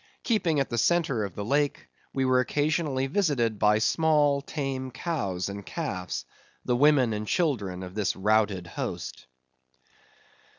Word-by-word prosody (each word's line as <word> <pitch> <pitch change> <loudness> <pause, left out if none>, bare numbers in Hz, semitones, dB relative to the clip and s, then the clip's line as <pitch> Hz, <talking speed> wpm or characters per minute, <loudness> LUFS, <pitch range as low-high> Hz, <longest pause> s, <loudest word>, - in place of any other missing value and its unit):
Keeping 180 - +1
at 135 - -1
the 120 - 0
centre 140 -5 +2
of 100 - -5
the 100 - -4
lake, 145 +4 0 0.2
we 135 -1 0
were 130 0 +4
occasionally 145 0 0
visited 135 - 0
by 105 0 +4
small 145 +3 +3
tame 135 -3 -4
cows 120 - -3
and 100 0 -6
calves; 90 - -4 0.4
the 125 - +1
women 135 -3 +4
and 105 0 -4
children 105 - 0
of 90 0 -8
this 105 -1 0
routed 105 -2 +1
host. 85 -5 -6
130 Hz, 140 wpm, -27 LUFS, 105-150 Hz, 0.4 s, were